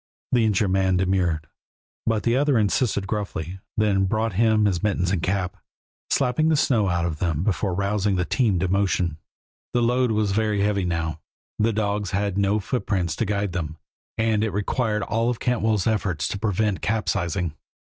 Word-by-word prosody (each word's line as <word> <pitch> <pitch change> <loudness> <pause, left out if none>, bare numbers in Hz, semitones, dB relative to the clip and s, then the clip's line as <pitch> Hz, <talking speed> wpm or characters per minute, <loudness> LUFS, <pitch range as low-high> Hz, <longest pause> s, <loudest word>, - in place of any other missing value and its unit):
The 120 -3 +3
injured 105 -2 +2
man 95 -1 +2
demurred, 90 -4 +1 0.6
but 110 -2 +1
the 120 0 +2
other 140 -1 +3
insisted 105 -1 +1
gruffly, 95 -3 -4 0.2
then 100 -3 +2
brought 110 +2 0
him 110 +1 +3
his 95 -4 +1
mittens 95 -4 0
and 95 -4 0
cap, 90 0 -1 0.5
slapping 140 +4 +2
the 160 - +4
snow 115 -8 +2
out 85 -1 0
of 80 -3 -3
them 80 -3 0
before 95 -2 0
rousing 100 +1 0
the 90 -1 0
team 110 - +1
to 90 +2 0
motion. 90 -4 +1 0.6
The 120 - +3
load 125 +1 +2
was 105 -2 +1
very 105 0 +1
heavy 100 -2 +1
now, 80 -2 -2 0.4
the 110 +2 +3
dogs 105 -2 -1
had 100 0 -1
no 100 +1 +2
footprints 95 - -1
to 115 - 0
guide 100 -1 -1
them, 80 -3 -4 0.4
and 110 -1 +2
it 110 - +1
required 105 +1 0
all 115 +3 0
of 120 - -2
Cantwell's 110 -5 +1
efforts 95 -8 0
to 100 - -4
prevent 105 -1 0
capsizing. 90 -6 -1
100 Hz, 175 wpm, -24 LUFS, 90-110 Hz, 0.6 s, the